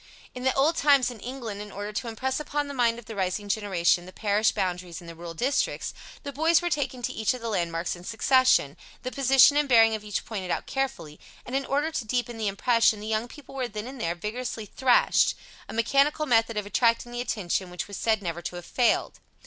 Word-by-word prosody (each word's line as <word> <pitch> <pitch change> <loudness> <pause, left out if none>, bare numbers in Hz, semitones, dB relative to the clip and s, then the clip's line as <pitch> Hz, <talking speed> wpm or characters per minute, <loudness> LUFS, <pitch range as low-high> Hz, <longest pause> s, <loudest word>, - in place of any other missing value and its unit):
In 250 - -7
the 260 - +2
old 300 +5 +3
times 275 -4 +4
in 235 - -11
England, 230 -4 -6
in 210 0 -8
order 205 +1 -6
to 220 +3 -3
impress 260 +4 -2
upon 295 -1 -2
the 285 - -6
mind 235 -3 +2
of 240 - -11
the 225 - -8
rising 195 +2 -2
generation 190 -4 +1
the - - -10
parish 210 +2 +1
boundaries 180 -1 -3
in 175 - -13
the 170 - -8
rural 165 0 -8
districts, 265 - -1 0.3
the 280 - -6
boys 325 +4 +4
were 350 -1 -2
taken 265 -4 -2
to 255 +2 -2
each 220 +3 0
of 250 - -9
the 230 - -3
landmarks 170 -4 -1
in 175 - -13
succession, 230 - +3 0.3
the 255 - -3
position 270 +1 +5
and 295 -1 +1
bearing 225 -2 +6
of 215 -1 -4
each 210 -2 -3
pointed 195 -5 -5
out - - -1
carefully, 255 - -3 0.3
and, 250 - -5
in 270 0 -1
order 290 +4 0
to 295 - -2
deepen 240 0 -2
the 215 - -1
impression, 225 +2 +2
the 210 - -8
young 220 +2 -1
people 290 +3 -13
were 260 -2 -2
then 210 -1 -6
and 260 -1 -8
there 170 +1 -1
vigorously 220 +4 -5
thrashed 250 +4 +3 0.3
a - - -5
mechanical 275 +7 +2
method 225 -4 +2
of 210 - -1
attracting 230 +3 +1
the 240 0 -3
attention 190 -5 -2
which 180 0 -5
was 200 - -7
said 220 +1 0
never 170 -1 -3
to 175 - -6
have 175 0 -8
failed. 245 -2 +1
230 Hz, 230 wpm, -26 LUFS, 200-260 Hz, 0.3 s, bearing